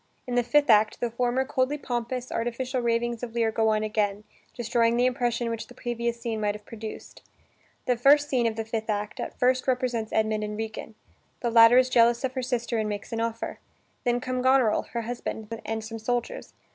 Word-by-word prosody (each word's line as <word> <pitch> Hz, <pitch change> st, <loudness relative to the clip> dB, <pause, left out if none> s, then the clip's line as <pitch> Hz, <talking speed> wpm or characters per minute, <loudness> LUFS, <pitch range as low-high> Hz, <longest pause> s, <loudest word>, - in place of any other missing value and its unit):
In 250 Hz, -, -5 dB
the 245 Hz, -, +3 dB
fifth 285 Hz, +5 st, +3 dB
act, 215 Hz, 0 st, +4 dB
the 240 Hz, -, -1 dB
former 245 Hz, +2 st, 0 dB
coldly 260 Hz, +3 st, 0 dB
pompous, 245 Hz, -1 st, -4 dB
artificial 245 Hz, +2 st, -2 dB
ravings 235 Hz, 0 st, 0 dB
of 235 Hz, -2 st, -6 dB
Lear 230 Hz, -1 st, +2 dB
go 220 Hz, 0 st, +2 dB
on 215 Hz, 0 st, +1 dB
again, 210 Hz, -1 st, -1 dB, 0.3 s
destroying 235 Hz, 0 st, +1 dB
the 245 Hz, -, +3 dB
impression 240 Hz, -1 st, 0 dB
which 230 Hz, -1 st, -5 dB
the 245 Hz, -, -15 dB
previous 235 Hz, -1 st, -3 dB
scene 225 Hz, -2 st, -3 dB
might 205 Hz, -1 st, 0 dB
have 210 Hz, 0 st, -11 dB
produced. 220 Hz, -1 st, -9 dB, 0.6 s
The 250 Hz, -, +2 dB
first 285 Hz, +4 st, +5 dB
scene 250 Hz, -4 st, +1 dB
of 225 Hz, -, -2 dB
the 225 Hz, 0 st, -3 dB
fifth 220 Hz, 0 st, -4 dB
act 210 Hz, 0 st, -2 dB
at -, -, -5 dB
first 255 Hz, +1 st, +2 dB
represents 245 Hz, -4 st, 0 dB
Edmund 215 Hz, -1 st, +1 dB
and 210 Hz, 0 st, -4 dB
Regan; 220 Hz, 0 st, -6 dB, 0.5 s
the 235 Hz, -, 0 dB
latter 230 Hz, +1 st, +8 dB
is 255 Hz, 0 st, +5 dB
jealous 235 Hz, -1 st, +4 dB
of 260 Hz, -1 st, -1 dB
her 260 Hz, -, -2 dB
sister 240 Hz, -2 st, -1 dB
and 215 Hz, -1 st, -1 dB
makes 205 Hz, +2 st, -5 dB
an 225 Hz, -, -1 dB
offer. 230 Hz, 0 st, -3 dB, 0.4 s
Then 245 Hz, -1 st, +1 dB
come 255 Hz, 0 st, -2 dB
Goneril, 260 Hz, -4 st, +3 dB
her 235 Hz, -, -1 dB
husband, 230 Hz, -1 st, -5 dB
and 220 Hz, 0 st, -3 dB
some 225 Hz, +1 st, -7 dB
soldiers. 245 Hz, -, -3 dB
235 Hz, 205 wpm, -26 LUFS, 220-250 Hz, 0.6 s, latter